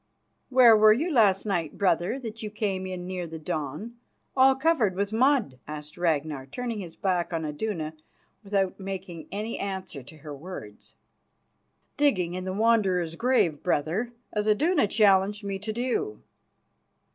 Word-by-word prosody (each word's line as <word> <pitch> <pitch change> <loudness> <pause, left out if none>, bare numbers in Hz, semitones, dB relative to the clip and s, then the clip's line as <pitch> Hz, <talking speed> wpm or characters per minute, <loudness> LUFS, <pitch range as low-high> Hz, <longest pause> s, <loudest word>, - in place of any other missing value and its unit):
"Where 250 -3 +7
were 215 0 +7
you 315 +10 -1
last 205 -6 +4
night, 175 -7 -2
brother, 185 +3 +1
that 225 -2 -7
you 215 - -4
came 195 -3 -2
in 180 -1 -5
near 180 -1 -4
the 165 0 -7
dawn, 155 - -5 0.4
all 265 0 +6
covered 265 - +2
with 200 +2 -2
mud?" 240 - +2
asked 150 0 -7
Ragnar, 155 -5 -1
turning 235 - -4
his 175 -4 -8
back 180 -3 -1
on 165 -2 -2
Iduna, 155 0 -3 0.5
without 195 -2 -1
making 190 -3 -6
any 210 +4 -4
answer 190 -7 -5
to 155 +5 -14
her 150 0 -8
words. 140 - -10 1.0
"Digging 190 -12 +2
in 185 0 -4
the 185 - -2
Wanderer's 195 -6 +2
grave, 230 - +2
brother, 180 +8 0 0.2
as 210 0 -1
Iduna 295 - +3
challenged 205 0 +3
me 195 -1 -3
to 210 +2 -4
do." 255 - -2
195 Hz, 150 wpm, -27 LUFS, 170-225 Hz, 1.0 s, Where